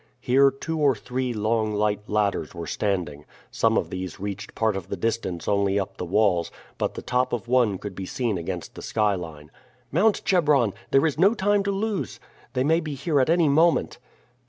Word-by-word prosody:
Here 135 +2 +4
two 160 +4 -5
or 140 -4 +4
three 125 +3 -3
long 110 -1 0
light 105 0 0
ladders 100 -6 0
were 85 -1 -5
standing. 85 -8 -2 0.3
Some - - +2
of - - -1
these 95 -2 -5
reached 100 +1 -6
part 110 -2 +1
of 95 -3 -5
the - - -3
distance 110 -7 -2
only 100 -1 +2
up 95 - -5
the - - -4
walls, 90 -3 +2 0.3
but - - -1
the - - -6
top 125 +1 0
of 120 -1 -3
one 120 -5 +3
could 100 +1 -7
be 95 0 -6
seen 120 -5 -1
against 90 0 -5
the - - -9
skyline. 85 -9 -2 0.4
"Mount, 200 +8 +2
Chebron! 145 - +3 0.2
There 135 +3 +4
is 155 -1 -1
no 195 +6 +5
time 205 0 +2
to 200 - +1
loose. 205 0 -2 0.3
They 130 -1 +1
may 160 +4 +3
be 155 -4 -5
here 140 +1 +1
at 130 - +1
any 170 -1 +4
moment." 160 +4 +2
115 Hz, 195 wpm, -25 LUFS, 100-145 Hz, 0.4 s, no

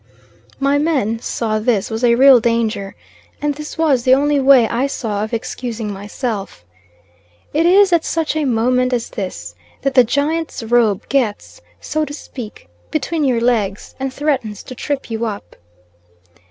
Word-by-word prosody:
My 280 +1 +2
men 265 -8 0
saw 220 -2 -2
this 215 -3 0
was 220 +2 -3
a 235 -1 +5
real 265 0 +7
danger, 225 -4 -1 0.4
and 295 -1 0
this 300 +1 -8
was 300 -6 +2
the 255 +2 +5
only 290 +1 +2
way 265 -4 +6
I 245 +5 0
saw 210 -6 -3
of 215 - -5
excusing 230 -2 -4
myself. 200 - -5 0.9
It 325 +3 +3
is 380 +1 +5
at 335 -1 +3
such 320 -2 -1
a 310 -1 0
moment 250 +1 +1
as 235 -2 -1
this 90 - -6 0.3
that 275 0 0
the 255 -1 +7
Giant's 290 +3 -1
robe 225 -3 +2
gets, 260 - -1 0.2
so 310 0 -2
to 290 -1 -5
speak, 240 - -9 0.2
between 310 +1 -1
your 250 -4 +1
legs 215 -5 0
and 270 0 -2
threatens 260 -8 -2
to - - -9
trip 270 -1 -4
you 225 +1 -2
up. 205 -2 -7
250 Hz, 160 wpm, -18 LUFS, 220-285 Hz, 0.9 s, real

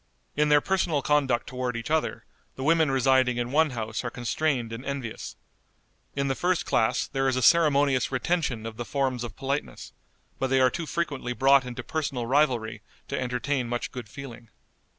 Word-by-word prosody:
In 150 0 +2
their 145 0 +6
personal 170 -6 0
conduct 140 -5 +2
toward 125 -1 -3
each 115 +6 -5
other 160 -1 0 0.3
the 130 - -5
women 160 0 +3
residing 130 -1 +3
in 120 0 -2
one 155 +2 +4
house 110 -3 -4
are 120 - -2
constrained 120 0 -1
and 115 +3 -6
envious. 135 -5 -5 0.8
In 140 0 0
the 135 - +1
first 180 +5 0
class 120 +3 +1
there 135 -1 -1
is 130 - +1
a 130 - 0
ceremonious 145 -6 +4
retention 130 -4 -1
of 115 -1 -6
the 120 - -3
forms 130 -1 -1
of 120 - -7
politeness, 140 +2 -4 0.5
but 135 - +1
they 135 0 +2
are 130 -1 +4
too 165 +2 -4
frequently 145 -8 -2
brought 135 +1 +4
into 125 0 -6
personal 140 -6 -2
rivalry 125 -4 +1 0.3
to - - -2
entertain 125 0 -1
much 120 0 -3
good 125 -5 -8
feeling. 120 -3 -10
130 Hz, 180 wpm, -26 LUFS, 120-145 Hz, 0.8 s, their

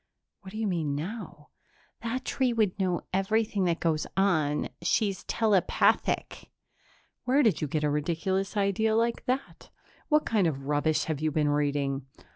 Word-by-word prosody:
"What 190 - -11
do 215 - -7
you 220 - -1
mean 165 -7 -1
now?" 165 -2 -6 0.5
"That 245 +3 -3
tree 255 -3 +1
would 210 -4 +1
know 180 -3 0
everything 200 +1 +1
that 170 -1 +1
goes 155 -2 0
on. 155 -7 +2
She's 195 +2 0
telepathic." 210 -5 +1 0.8
"Where 270 +4 +4
did 215 - +2
you 150 - 0
get 150 +2 -2
a 150 - +2
ridiculous 190 +7 -1
idea 205 +2 +2
like 230 +1 +1
that? 260 +2 -3 0.4
What 305 -1 +3
kind 210 -6 +2
of 135 -4 -3
rubbish 150 +1 +1
have 155 -2 -3
you 155 - +1
been 150 0 +1
reading?" 140 -2 0
185 Hz, 155 wpm, -28 LUFS, 150-220 Hz, 0.8 s, Where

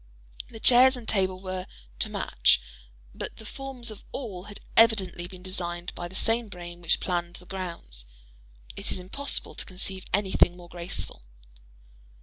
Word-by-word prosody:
The 225 - -9
chairs 255 +3 +7
and 235 -3 -9
table 190 -3 +2
were 185 -1 -3 0.3
"to - - 0
match," - - +4 0.5
but - - -5
the 220 - -11
forms 255 -1 -4
of 210 - -10
all 200 -9 -4
had 205 0 -7 0.2
evidently 200 -6 +5
been 180 0 -11
designed 175 -2 -2
by 175 - -4
the 185 - -11
same 225 +3 +2
brain 175 -2 -8
which 170 - +2
planned 175 -1 -1
"the 180 - -9
grounds;" 170 - -5 0.7
it - - -2
is - - +2
impossible 200 +11 -2
to - - -3
conceive 190 0 -2
anything 190 -3 +4
more 175 -1 -12
graceful. 170 - -4
185 Hz, 155 wpm, -28 LUFS, 175-220 Hz, 0.7 s, chairs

